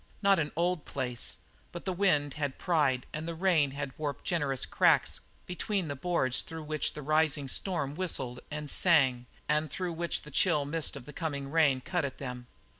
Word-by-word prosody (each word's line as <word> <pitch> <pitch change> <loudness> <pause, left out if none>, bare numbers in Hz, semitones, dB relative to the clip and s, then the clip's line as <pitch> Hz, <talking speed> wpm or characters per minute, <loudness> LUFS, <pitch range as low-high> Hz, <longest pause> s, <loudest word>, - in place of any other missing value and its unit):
Not 195 -2 +5
an 150 -2 -1
old 175 -1 +1
place, 125 -3 -2 0.3
but 175 - -8
the 190 - 0
wind 150 -7 +2
had 145 -3 -3
pried 145 -8 +2
and 155 +2 -4
the 170 - -3
rain 145 -7 +1
warped 145 -3 -3
generous 145 -7 0
cracks - - +3 0.3
between 185 -1 -2
the 140 - -2
boards 130 -4 +1
through 160 -1 -7
which 155 0 -1
the 150 - -7
rising 155 -1 +2
storm 150 -1 -1
whistled 135 -8 -2
and 150 0 -4
sang 135 -7 +3 0.2
and 150 +1 +1
through 180 -2 -3
which 170 +1 -2
the 150 - -10
chill 150 -1 +3
mist 150 +1 -1
of 135 -3 -8
the 150 - -9
coming 140 -4 -3
rain 145 -5 +4
cut 175 +4 -1
at 140 -2 -3
them. 125 -2 -6
150 Hz, 185 wpm, -30 LUFS, 140-170 Hz, 0.3 s, Not